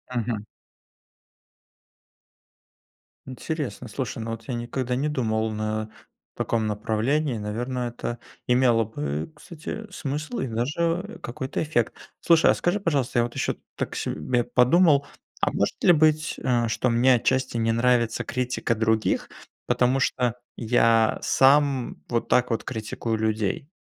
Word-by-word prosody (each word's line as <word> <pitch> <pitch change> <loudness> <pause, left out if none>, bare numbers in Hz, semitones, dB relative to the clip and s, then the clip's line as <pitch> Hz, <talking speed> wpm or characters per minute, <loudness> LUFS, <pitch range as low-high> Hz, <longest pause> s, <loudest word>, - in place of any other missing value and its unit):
Мгм. 115 -3 -2 2.8
Интересно, 130 -3 -5
слушай. 125 +2 -4
Но 115 0 -4
вот 115 0 -7
я 125 - -3
никогда 125 +1 -2
не 140 +4 0
думал, 110 -5 0
на 110 0 -3 0.5
таком 110 -2 0
направлении, 115 +6 0
наверное, 120 +4 -3
это 120 0 -5 0.3
имело 125 -2 +4
бы, 75 - -4
кстати, 175 +7 -8
смысл 150 - -4
и 130 - -1
даже 165 - -1
какой-то 130 +2 -4
эффект. 135 -7 0 0.3
Слушай, 165 -1 +5
а - - +3
скажи, 175 +4 0
пожалуйста, 140 -10 0
я 120 - +4
вот 120 - -4
ещё - - 0
тут - - -24
так - - -4
себе 120 +11 -1
подумал: 140 +5 +4 0.4
а - - +2
может - - -1
ли 175 - +7
быть, 155 0 +2
э, 120 -2 +1
что 110 +3 0
мне 125 +2 +4
отчасти 130 +1 0
не 115 0 +1
нравится 115 -1 +2
критика 125 -2 -1
других, 110 0 +1 0.4
потому 125 +2 +2
что 125 -2 0 0.2
я 115 -1 +3
сам 135 -1 +3
вот 120 -1 -1
так 125 0 +3
вот 115 - -1
критикую 110 -1 -3
людей, 110 - -1
125 Hz, 135 wpm, -25 LUFS, 115-140 Hz, 2.8 s, ли